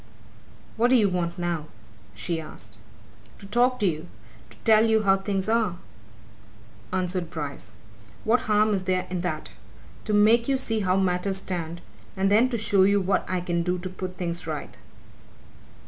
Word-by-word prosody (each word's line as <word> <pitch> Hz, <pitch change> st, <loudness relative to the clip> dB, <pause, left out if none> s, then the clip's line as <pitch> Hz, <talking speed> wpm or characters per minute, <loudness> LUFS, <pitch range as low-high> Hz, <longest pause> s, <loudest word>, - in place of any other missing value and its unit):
"What 240 Hz, +2 st, +3 dB
do 260 Hz, -, +5 dB
you 210 Hz, -5 st, +4 dB
want 175 Hz, -1 st, -2 dB
now?" 170 Hz, -3 st, -2 dB, 0.5 s
she 160 Hz, +10 st, -3 dB
asked. 155 Hz, -, -11 dB, 0.6 s
"To 200 Hz, -, -13 dB
talk 245 Hz, +5 st, +2 dB
to -, -, +3 dB
you 160 Hz, -2 st, -1 dB, 0.4 s
to -, -, -12 dB
tell 220 Hz, -1 st, +6 dB
you 220 Hz, -1 st, +3 dB
how 195 Hz, -1 st, +4 dB
things 195 Hz, 0 st, -2 dB
are," 220 Hz, -5 st, +1 dB, 1.2 s
answered 180 Hz, -2 st, -2 dB
Bryce. 140 Hz, -9 st, -6 dB, 0.5 s
"What 230 Hz, +3 st, +3 dB
harm 210 Hz, 0 st, +4 dB
is 190 Hz, -2 st, -1 dB
there 185 Hz, -1 st, 0 dB
in 180 Hz, -1 st, -2 dB
that? 160 Hz, -3 st, -4 dB, 0.5 s
To 215 Hz, -, -1 dB
make 225 Hz, +3 st, +5 dB
you 275 Hz, -1 st, +2 dB
see 225 Hz, -4 st, 0 dB
how 185 Hz, -2 st, +1 dB
matters 190 Hz, +1 st, +1 dB
stand, 170 Hz, -3 st, -4 dB, 0.4 s
and 195 Hz, +1 st, +2 dB
then 230 Hz, +5 st, +5 dB
to 240 Hz, -, -1 dB
show 205 Hz, -3 st, +2 dB
you 200 Hz, +1 st, +4 dB
what 195 Hz, +1 st, 0 dB
I 185 Hz, -1 st, -1 dB
can 175 Hz, -1 st, -1 dB
do 180 Hz, +1 st, -1 dB
to 185 Hz, +1 st, -5 dB
put 185 Hz, 0 st, -6 dB
things 170 Hz, -2 st, -3 dB
right." 155 Hz, -2 st, -5 dB
190 Hz, 170 wpm, -25 LUFS, 175-215 Hz, 1.2 s, tell